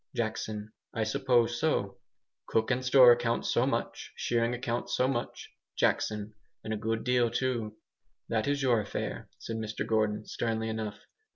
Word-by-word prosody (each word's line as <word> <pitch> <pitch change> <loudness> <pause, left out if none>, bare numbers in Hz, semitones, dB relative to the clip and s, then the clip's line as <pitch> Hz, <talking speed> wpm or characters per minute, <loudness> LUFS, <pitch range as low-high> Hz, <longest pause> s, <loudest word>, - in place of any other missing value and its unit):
Jackson. 110 -2 -3 0.2
"I 115 - +1
suppose 120 +1 +2
so." 100 -11 0 0.5
"Cook 110 +3 +1
and 130 0 0
store 130 -1 +8
account, 120 -1 +1
so - - +2
much; - - -3
shearing 115 0 +1
account 120 -1 -3
so 125 - +2
much." 120 -3 -3 0.3
Jackson. 105 0 0 0.3
"And 110 - -3
a - - 0
good 110 +1 -2
deal 125 -1 +3
too." 120 -3 -2 0.5
"That 110 +1 0
is 140 -1 0
your 120 -4 +3
affair," 100 - -5
said 115 - -5
Mr 110 -1 -3
Gordon, 110 -1 0
sternly 110 -1 -2
enough. 110 -2 -4
115 Hz, 155 wpm, -30 LUFS, 110-120 Hz, 0.5 s, store